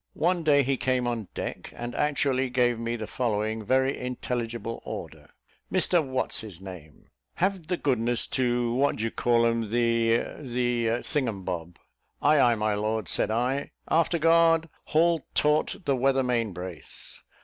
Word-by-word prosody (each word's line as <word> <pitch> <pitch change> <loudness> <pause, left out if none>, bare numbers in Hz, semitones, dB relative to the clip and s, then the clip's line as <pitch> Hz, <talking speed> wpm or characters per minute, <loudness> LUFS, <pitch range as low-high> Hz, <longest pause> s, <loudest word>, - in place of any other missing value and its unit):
One 175 +2 +2
day 145 -3 +4
he 135 +1 0
came 130 -1 0
on 115 -4 -3
deck, - - -5
and 120 0 -5
actually 140 -3 +1
gave 120 -2 +1
me 115 0 -2
the 110 -2 -5
following 110 -2 -2
very 130 +4 +2
intelligible 120 -2 -4
order. - - -8 0.4
"Mr, 175 -3 +3
What's 130 -2 0
his 105 -6 -8
name, 90 -6 -11 0.3
have 185 -3 -1
the 180 0 -1
goodness 120 -5 +1
to 120 -2 0
what 140 +3 +2
do 110 - -4
ye 115 - -1
call 120 -1 +2
'em, 115 -2 0
the, 115 0 +2 0.2
the 120 -3 -1
thingumbob." 95 - -3 0.4
"Ay, 150 +1 +4
ay, 120 -3 +5
my 105 -1 0
lord," 105 -1 -2
said - - +2
I. 125 +5 -1 0.2
"Afterguard! 165 0 +3 0.2
haul 165 0 +2
taut 150 +1 +2
the 140 - +2
weather 135 +1 +2
main 120 -4 0
brace." 90 -2 -5
120 Hz, 150 wpm, -27 LUFS, 115-140 Hz, 0.4 s, ay